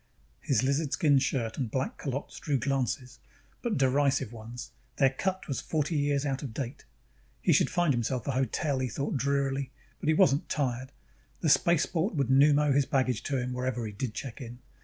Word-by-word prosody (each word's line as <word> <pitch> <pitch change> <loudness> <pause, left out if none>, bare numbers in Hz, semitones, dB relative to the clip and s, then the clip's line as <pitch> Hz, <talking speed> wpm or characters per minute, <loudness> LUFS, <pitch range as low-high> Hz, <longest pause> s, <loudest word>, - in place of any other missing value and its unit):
His 130 - +1
lizardskin 140 +1 +2
shirt 120 -3 -1
and 125 -5 -1
black 130 +3 -2
culottes 140 +1 -4
drew 145 -2 0
glances, 130 -1 -2 0.4
but 235 -3 -1
derisive 135 -3 +2
ones: 120 +2 -8 0.2
their 135 -2 +4
cut 185 +7 -2
was 135 - -2
forty 155 +1 -1
years 145 -1 +1
out 135 -2 -1
of 125 -6 -6
date. 135 +1 -5 0.5
He - - +3
should - - +4
find 175 -5 +2
himself 120 0 -1
a - - 0
hotel, 135 +2 0
he 130 -1 -1
thought 140 +6 -2
drearily, 140 0 0 0.3
but - - -5
he 155 - +4
wasn't 140 -1 +3
tired; 130 -2 -1 0.5
the 160 - +2
spaceport 170 +4 +2
would 135 -4 0
pneumo 145 +1 +5
his 140 -1 +2
baggage 130 -4 +1
to 140 - 0
him 125 0 -2
whenever 125 -2 -2
he 105 - -4
did 110 +2 -4
check 135 -1 -6
in. 120 -1 -8
135 Hz, 180 wpm, -29 LUFS, 125-145 Hz, 0.5 s, pneumo